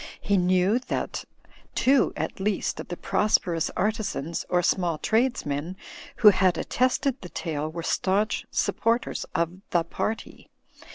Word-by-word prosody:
He 200 - +1
knew 185 +4 +3
that - - -3 0.5
two 270 +1 +4
at - - -3
least 200 +1 -1
of - - -6
the 175 - -5
prosperous 175 -6 +1
artisans 205 - -2
or 180 -1 +2
small 175 -3 +1
tradesmen 185 - 0 0.4
who 215 - +8
had 185 -2 +3
at - - -5
tested 255 +1 +1
the 180 - -8
tale 155 -3 -3
were 165 +1 -6
staunch 200 +5 0
supporters 230 +1 0
of 170 +2 -1
The 170 -1 +2
Party. 215 +6 -4
185 Hz, 135 wpm, -26 LUFS, 170-220 Hz, 0.5 s, who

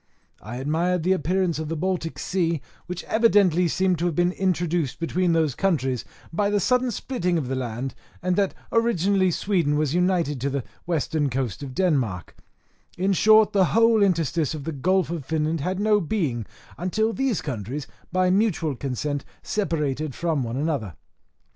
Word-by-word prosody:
I 110 +4 -7
admired 160 +6 0
the 185 - +2
appearance 180 -1 +1
of 155 -1 -4
the 165 - -2
Baltic 175 -1 -2
Sea, 170 -4 0 0.3
which 180 0 -5
evidently 200 -6 +3
seemed 185 +1 +1
to 175 - +1
have 170 - -2
been 175 +2 +2
introduced 175 -6 -1
between 175 +1 +1
those 160 -4 +2
countries 135 - 0 0.3
by 200 +4 +1
the 205 0 +2
sudden 250 +5 +2
splitting 195 -6 -1
of 145 -6 -2
the 130 - -2
land, 125 +1 -3 0.3
and 180 0 0
that 195 -1 +1 0.2
originally 200 -4 +2
Sweden 170 -5 +1
was 150 -2 0
united 175 -6 +1
to 140 - 0
the 140 -2 -2 0.2
western 155 -3 0
coast 125 -4 -2
of 135 -3 -7
Denmark; 130 - 0 0.6
in 190 +2 +2
short, 215 +3 +5
the 195 -2 +4
whole 230 -1 +5
interstice 165 -6 +1
of 150 - -6
the 160 - -3
Gulf 180 +5 +1
of 170 -4 -3
Finland 155 +2 -1
had 185 +5 -2
no 210 0 +3
being, 150 - -1 0.3
until 220 +6 0
these 265 -5 0
countries, 130 +2 -4 0.3
by 185 0 +2
mutual 185 -7 +1
consent, 140 +2 -3 0.2
separated 155 - -1
from 165 -4 0
one 120 0 -3
another. 140 - -2
170 Hz, 165 wpm, -24 LUFS, 145-190 Hz, 0.6 s, short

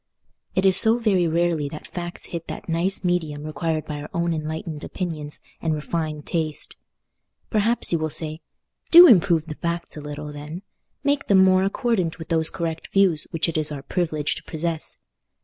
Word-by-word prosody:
It 190 - +2
is 190 -1 +6
so 225 +1 +6
very 195 -7 +2
rarely 165 -3 0
that 155 - -9
facts 175 0 -5
hit 170 -1 -5
that - - -7
nice 180 +4 +1
medium 160 -5 -1
required 155 0 -2
by 150 -1 -5
our 150 - -8
own 170 0 0
enlightened 155 0 -5
opinions 155 -5 -5 0.2
and 160 -2 0
refined 155 -1 -3
taste! 160 -3 -2 0.8
Perhaps 225 +2 +2
you 170 - +2
will 155 0 -1
say, 155 +1 -2 0.5
"Do 345 +2 +11
improve 175 - +5
the 155 - -6
facts 170 +2 -4
a - - -6
little, 150 0 -7
then; 150 +5 -8 0.4
make 285 0 0
them 190 -2 +6
more 185 0 +4
accordant 195 -4 0
with 160 -1 -9
those 160 -1 +2
correct 165 -2 -4
views 190 -6 +3
which 165 +1 0
it 160 -1 -1
is 155 -1 +3
our 140 -2 -6
privilege 155 -4 -1
to - - -8
possess. 160 0 -4
165 Hz, 180 wpm, -23 LUFS, 155-180 Hz, 0.8 s, Do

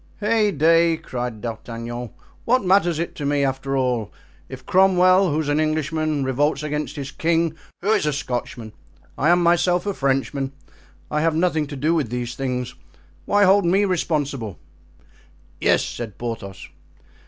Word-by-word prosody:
"Heyday!" 170 -7 +3
cried 120 -6 -5
D'Artagnan, 115 +1 -6 0.3
"what 245 -3 +2
matters 180 -3 +3
it 170 +1 -3
to 150 - -5
me, 140 0 +1
after 135 0 -2
all, 125 -5 -1 0.4
if 130 0 -9
Cromwell, 185 -1 +4
who's 155 0 -1
an 145 +1 +1
Englishman, 155 -1 0
revolts 140 +2 0
against 150 0 -3
his 140 -2 -5
king, 165 -1 +1 0.3
who 205 - +2
is 210 -8 +2
a - - +2
Scotchman? 120 -5 -4 0.4
I 150 - +1
am 175 0 +4
myself 175 +1 +2
a 200 - -1
Frenchman. 135 -1 -1 0.6
I 150 - 0
have 165 0 +1
nothing 160 -3 +1
to 145 - -7
do 150 +5 +1
with 150 -8 0
these 125 0 -3
things—why 130 +10 -3
hold 200 +1 +5
me 190 +4 +3
responsible?" 145 - -2 1.0
"Yes," - - +2
said 115 -4 -6
Porthos. 115 -5 -6
150 Hz, 145 wpm, -22 LUFS, 130-175 Hz, 1.0 s, hold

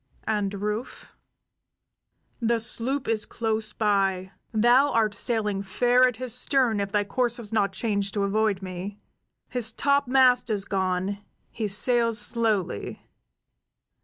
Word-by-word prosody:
"And 210 -3 0
Rufe?" 210 +4 -5 1.2
"The 235 -1 +1
sloop 245 +4 -1
is 220 -2 -1
close 220 -2 -2
by. 195 -3 0 0.2
Thou 240 +6 +4
art 215 -2 +2
sailing 210 -2 -1
fair 245 +6 +3
at 250 - -2
his 255 -2 -3
stern 250 -6 +1
if 200 0 -2
thy 205 -1 +2
course 240 +3 -1
was 225 -3 -9
not 200 -3 +2
changed 200 0 -2
to 200 - +1
avoid 200 -1 0
me. 185 +2 -6 0.5
His 240 -3 -1
topmast 260 -2 +3
is 205 -3 -2
gone; 190 +1 -1 0.3
he 220 -2 -3
sails 230 +2 +2
slowly." 215 - -1
220 Hz, 130 wpm, -25 LUFS, 200-240 Hz, 1.2 s, Thou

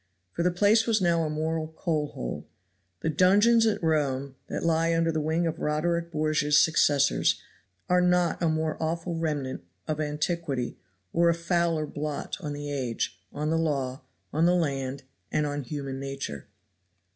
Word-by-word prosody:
For - - -3
the 180 - +3
place 205 +5 +3
was 225 -2 +3
now 170 -3 +2
a 155 - -1
moral 155 +1 -1
coal 160 -1 -1
hole. - - -6 0.5
The 160 - 0
dungeons 205 +8 +5
at 215 - 0
Rome 140 -4 0
that - - -3
lie 165 0 +2
under 165 0 +2
the 160 -1 -1
wing 160 +3 0
of 165 0 -2
Roderick 170 +3 0
Borgia's 150 -1 +2
successors 145 -2 +3 0.5
are 180 0 +4
not 180 -1 +2
a 170 - +3
more 155 0 -1
awful 165 +2 -2
remnant 150 - -2 0.2
of 155 0 -1
antiquity 150 -3 -2 0.3
or 170 0 +4
a 170 - +3
fouler 170 -2 +1
blot 150 0 -4
on 150 -5 -4
the 145 0 -5
age, 120 -9 -3
on 150 +2 -2
the 165 - +2
law, 140 -4 -1 0.3
on 160 +3 +3
the 180 - +4
land, 135 -5 -1 0.3
and 150 - +1
on 145 0 -2
human 140 -1 -5
nature. 135 - -5
155 Hz, 165 wpm, -27 LUFS, 145-170 Hz, 0.5 s, dungeons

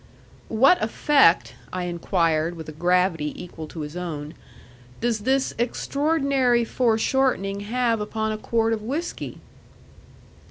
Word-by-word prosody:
"What 265 +11 +4
effect," 225 - +3 0.2
I 185 -1 -3
inquired 170 -2 0
with 160 -2 -9
a - - -6
gravity 175 -1 +1
equal 160 -3 -8
to 160 0 -7
his 150 +2 -7
own, 155 -4 -5 0.7
"does 235 -2 0
this 265 +5 +1
extraordinary 275 -1 +1
foreshortening 225 -3 +1
have 235 -2 +1
upon 220 +1 -2
a 215 - -3
quart 225 0 +1
of 220 - -3
whiskey?" 285 +10 -4
220 Hz, 120 wpm, -24 LUFS, 175-250 Hz, 0.7 s, What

